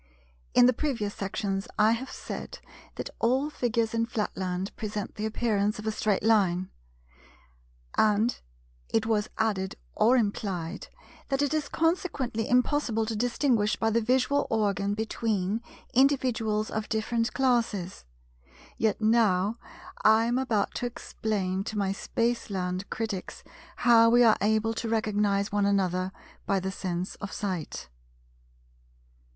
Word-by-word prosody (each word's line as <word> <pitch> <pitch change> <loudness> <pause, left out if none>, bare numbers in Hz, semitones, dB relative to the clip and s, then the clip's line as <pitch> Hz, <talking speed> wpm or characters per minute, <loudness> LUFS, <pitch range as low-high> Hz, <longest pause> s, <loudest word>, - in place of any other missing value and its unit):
In 245 - +8
the 250 - +5
previous 230 -7 -2
sections 195 0 -3
I 215 +1 +5
have 235 +3 -2
said - - -7 0.4
that - - -5
all 260 +6 +1
figures 230 -4 0
in 230 0 +1
Flatland 190 -4 -3
present 210 -2 -4
the 215 +1 -3
appearance 210 -2 0
of 210 - -8
a 220 - +1
straight 210 -2 0
line; 185 -5 +2 1.2
and 215 +2 +2 0.5
it 220 -1 +1
was 220 -2 0
added 195 -4 0 0.2
or 245 +4 +4
implied, 195 -5 -2 0.4
that 275 0 +1
it 285 +1 0
is 305 -2 -1
consequently 325 - -1
impossible 250 -3 +2
to 220 0 -3
distinguish 235 -1 +1
by 225 - 0
the 230 +1 +2
visual 260 +4 +2
organ 205 -2 0
between 220 -1 -1 0.3
individuals 245 -5 +2
of 220 0 -3
different 230 +1 0
classes: 230 -8 0 0.8
yet 220 0 +1
now 215 -1 +3 0.4
I 220 +1 +5
am 240 +2 +1
about 225 -6 0
to 245 - -1
explain 195 -5 -3
to 215 - -4
my 195 -2 +1
Spaceland 200 -4 -2
critics 215 -4 -4 0.3
how 230 -2 +6
we 240 +1 +6
are 225 -2 +5
able 220 +2 +2
to 225 0 -3
recognize 210 -2 +1
one 205 -1 +2
another 185 -2 +1 0.4
by 195 - +2
the 190 +1 -3
sense 180 -1 -3
of 200 - -6
sight. 185 -7 -4
220 Hz, 135 wpm, -28 LUFS, 200-235 Hz, 1.2 s, In